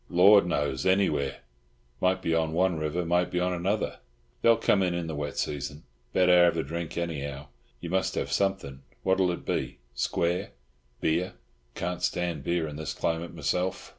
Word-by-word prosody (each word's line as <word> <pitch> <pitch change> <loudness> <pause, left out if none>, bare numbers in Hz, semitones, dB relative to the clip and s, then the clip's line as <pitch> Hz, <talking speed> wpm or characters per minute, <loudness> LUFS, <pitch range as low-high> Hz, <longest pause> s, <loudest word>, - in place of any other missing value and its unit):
"Lord 95 +1 +6
knows! 70 -6 -1
Anywhere! 95 -8 +1 0.6
Might 95 0 +1
be 80 - +1
on 80 -1 +1
one 90 -1 +2
river, 80 +3 -1
might 90 +1 +2
be 90 - -1
on 90 +1 +1
another. 95 +5 -1 0.4
They'll 115 -1 +5
come 105 -3 +3
in 90 -2 +1
in 85 -1 -2
the 80 - -4
wet 75 -1 -4
season. 75 +1 -3 0.3
Better 90 +1 +6
have 85 - +2
a - - 0
drink, 85 +3 -5
anyhow. 70 -4 -4 0.3
You 85 - -5
must 95 0 0
have - - -2
something. 95 -9 -1 0.2
What'll 95 -1 +3
it 85 - -4
be—square? 85 +10 -2 0.5
Beer? 85 +4 0 0.4
Can't 90 0 -3
stand 85 -5 -1
beer 85 +1 0
in 75 -1 -7
this 80 -2 -4
climate, 85 +1 -2
myself." 90 +5 -1
85 Hz, 165 wpm, -28 LUFS, 75-90 Hz, 0.6 s, Lord